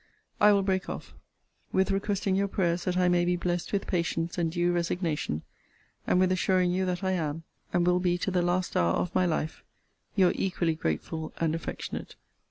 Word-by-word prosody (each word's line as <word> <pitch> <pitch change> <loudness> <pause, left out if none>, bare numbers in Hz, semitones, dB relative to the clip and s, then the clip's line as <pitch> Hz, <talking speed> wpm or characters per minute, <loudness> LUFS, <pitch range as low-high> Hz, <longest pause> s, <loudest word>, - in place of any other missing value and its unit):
I 210 0 +7
will 200 -1 +3
break 190 -1 0
off, - - -7 0.6
with 190 +1 +2
requesting 195 -1 0
your 200 +1 +2
prayers 175 -3 0
that 180 -1 0
I 180 -1 +3
may 175 0 +3
be 180 +1 +2
blessed 175 -1 -2
with 200 -1 0
patience 170 -2 -1
and 170 -2 0
due 175 +1 +1
resignation; 170 - -1 0.6
and 180 - +3
with 185 0 +3
assuring 185 -1 +2
you, 185 +1 0
that 180 +1 -2
I 190 - +1
am, 165 -3 -2 0.3
and 175 -1 +2
will 180 0 +3
be 180 -1 +1
to 190 - -2
the 180 -1 +2
last 180 +1 0
hour 85 0 +3
of 180 - -1
my 185 -1 +3
life, 160 -1 -2 0.5
Your 185 -3 +5
equally 175 -3 0
grateful 155 - -3
and 165 -1 +1
affectionate 165 - -5
CL. - - -31
180 Hz, 195 wpm, -28 LUFS, 170-185 Hz, 0.6 s, I